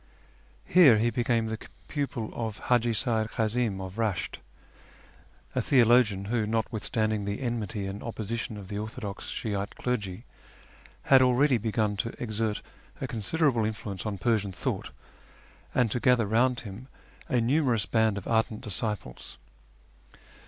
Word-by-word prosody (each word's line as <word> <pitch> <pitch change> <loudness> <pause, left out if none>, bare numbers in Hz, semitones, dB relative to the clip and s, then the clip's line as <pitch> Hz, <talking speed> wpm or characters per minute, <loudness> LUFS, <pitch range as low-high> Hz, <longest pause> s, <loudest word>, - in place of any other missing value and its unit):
Here 150 -11 +7
he 115 +2 +2
became 115 -1 +1
the 110 0 -3 0.3
pupil 135 -7 -3
of 110 -3 -4
Haji 120 -1 +2
Seyyid 110 -1 +1
Kazim 110 -2 0
of 95 +1 -7
Eesht, 110 -5 -1 1.2
a - - +1
theologian 120 -6 +4
who, 110 0 0
notwithstanding 110 -1 -1
the 100 0 -3
enmity 115 -5 -3
and 95 +1 -5
opposition 115 0 -4
of 100 -2 -9
the 100 0 -4
orthodox 105 -2 -6
Shi'ite 100 -2 -3
clergy, 110 -3 -3 0.8
had 135 -1 +6
already 130 0 +4
begun 110 -1 0
to 115 +3 -2
exert 110 -2 -2 0.4
a - - -2
considerable 120 +2 +1
influence 105 -3 -4
on 105 -2 -3
Persian 105 -1 +1
thought, - - -3 0.9
and 120 -4 +3
to 125 - 0
gather 125 -2 +4
round 120 +4 +2
him 110 +4 -9 0.4
a 125 - +2
numerous 125 -3 +2
band 110 -3 +2
of 100 - -6
ardent 110 -1 +1
disciples. 105 - -4
110 Hz, 135 wpm, -28 LUFS, 105-120 Hz, 1.2 s, Here